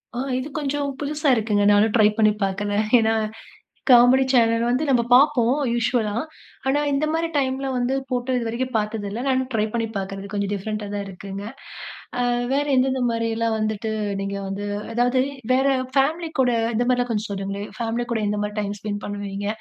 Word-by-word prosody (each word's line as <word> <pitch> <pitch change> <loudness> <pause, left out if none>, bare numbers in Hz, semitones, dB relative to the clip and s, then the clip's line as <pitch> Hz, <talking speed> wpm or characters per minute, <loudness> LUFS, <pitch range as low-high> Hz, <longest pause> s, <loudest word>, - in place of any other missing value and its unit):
ஆ. - - -2 0.2
இது 255 - -4
கொஞ்சம் 285 0 -1
புதுசா 295 +1 -1
இருக்குங்க 215 -2 +1
நானும் 210 +1 +3
ட்ரை 215 -3 +6
பண்ணி 215 -1 +5
பார்க்கறேன். 205 +2 -1
ஏன்னா 225 0 +2 0.8
காமெடி 250 +2 +7
சேனல் 230 -2 +3
வந்து 255 +5 +1
நம்ம 250 -3 +3
பார்ப்போம் 255 -2 +5 0.2
யூஷுவலா. 235 -3 0 0.5
ஆனா, 275 +2 +2
இந்த 280 +2 +1
மாதிரி 330 +1 0
டைம்ல 270 -1 0
வந்து 250 +1 0 0.2
போட்ட 250 +1 -1
இது 240 -2 -2
வரைக்கும் 255 +2 -3
பார்த்தது 210 -1 -2
இல்ல. 220 +4 -4
நானும் 260 -1 +1
ட்ரை 215 -2 +1
பண்ணி 230 -1 0
பார்க்கறது 195 0 -4
கொஞ்சம் 200 -1 -1
டிஃப்ரெண்ட்டா 210 +1 -4
தான் 200 -1 -3
இருக்குங்க. 195 +1 -7 0.8
அ - - +1 0.2
வேற 285 +1 +2
எந்தெந்த 260 0 +2
மாதிரியெல்லாம் 230 0 0
வந்துட்டு 215 0 -2 0.3
நீங்க 195 0 -3
வந்து 200 +1 -4 0.3
அதாவது 245 +2 +2 0.3
வேற 265 +2 +3 0.3
ஃபேமிலி 320 +5 +1
கூட 250 -2 +3 0.2
இந்தமாதிரிலாம் 245 +1 +1
கொஞ்சம் 215 -1 -2
சொல்லுங்களேன். 200 +1 -4
ஃபேமிலி 235 +1 -2
கூட 225 -2 0
எந்த 210 0 -1
மாதிரி 210 0 -4
டைம் 205 0 -3
ஸ்பெண்ட் 205 0 -4
பண்ணுவீங்க? 205 0 -5
230 Hz, 170 wpm, -23 LUFS, 205-255 Hz, 0.8 s, காமெடி